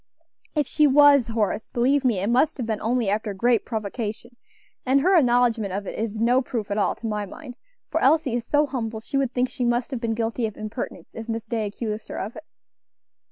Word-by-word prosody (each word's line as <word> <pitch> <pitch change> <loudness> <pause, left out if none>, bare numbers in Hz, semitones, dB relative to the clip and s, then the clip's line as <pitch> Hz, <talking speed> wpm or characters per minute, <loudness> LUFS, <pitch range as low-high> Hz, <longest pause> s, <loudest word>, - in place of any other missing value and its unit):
"If 295 -1 +2
she 300 +3 +3
was, 285 -3 +6
Horace, 220 -1 -1
believe 265 +4 +2
me 240 -6 +2
it 200 - -1
must 275 +6 +2
have 250 - -3
been 220 -2 -2
only 235 0 0
after 205 0 -1
great 235 +3 +2
provocation, 220 +1 -5 0.5
and 265 +2 +3
her 375 +5 +4
acknowledgment 240 - +3
of 200 +1 -3
it - - -5
is 220 -1 -3
no 245 +3 +3
proof 230 -5 -4
at 205 - 0
all, - - +1
to - - -10
my 210 -2 -2
mind; 255 +4 -10 0.4
for - - 0
Elsie 310 -6 +3
is 240 -1 -1
so 295 +5 +2
humble, 230 -5 -4
she 255 +5 -3
would 270 -3 +1
think 250 0 +1
she 255 - -4
must 240 +2 0
have 255 -3 -4
been 225 -2 -1
guilty 225 +1 -1
of 215 - -10
impertinence 215 +3 -6
if 225 +1 -8
Miss 225 0 -2
Day 225 -2 -2
accused 215 +1 -5
her - - -6
of 210 +4 -5
it." - - -10
235 Hz, 220 wpm, -24 LUFS, 220-255 Hz, 0.5 s, was